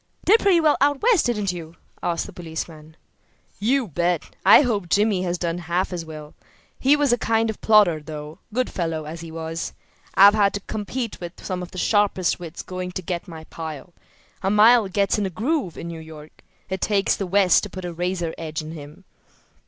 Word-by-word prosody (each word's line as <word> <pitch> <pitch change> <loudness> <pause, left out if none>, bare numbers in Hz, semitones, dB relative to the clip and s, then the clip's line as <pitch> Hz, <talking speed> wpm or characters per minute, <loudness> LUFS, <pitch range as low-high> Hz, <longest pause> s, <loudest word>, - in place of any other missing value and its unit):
"Did 435 +5 +6
pretty 390 -5 +4
well 310 -2 +3
out 285 +2 +2
West, 445 - +4
didn't 210 -5 0
you?" 170 -2 -8 0.3
asked 170 -1 -1
the 200 - -10
policeman. 160 -2 -7 0.6
"You 245 +4 +1
bet! 175 0 -1
I - - +8
hope 205 -8 -1
Jimmy 205 0 +2
has 180 -1 -1
done 170 0 -2
half 175 +2 -1
as 175 -2 -4
well. 155 -2 -10 0.5
He 275 +3 +5
was 290 -4 +2
a 240 - +1
kind 225 0 +1
of 215 - -13
plodder, 205 -7 +5
though, 150 +2 -8
good 250 +3 -1
fellow 165 -3 -3
as 160 +2 -7
he 165 - -8
was. 165 0 -5 0.4
I've 200 +1 +8
had 205 -2 +2
to - - -2
compete 220 +3 -4
with 175 0 -9
some 185 -1 -3
of 180 - -7
the - - -11
sharpest 195 -3 +1
wits 170 -1 -8
going 185 0 -5
to 185 - -4
get 175 +1 -4
my 160 -2 -9
pile. 160 0 -8 0.5
A 195 - 0
man 220 +3 +6
gets 200 +2 +1
in 200 - 0
a - - -4
groove 220 - -2
in - - -6
New 165 -1 -7
York. 155 -1 -13 0.2
It 190 0 -4
takes 200 -2 +2
the 195 - -4
West 190 -1 +4
to 210 - -6
put 185 -1 -7
a 175 - -5
razor 175 -1 -2
edge 155 -1 -4
on 155 - -7
him." 150 +3 -11
180 Hz, 205 wpm, -23 LUFS, 165-210 Hz, 0.6 s, I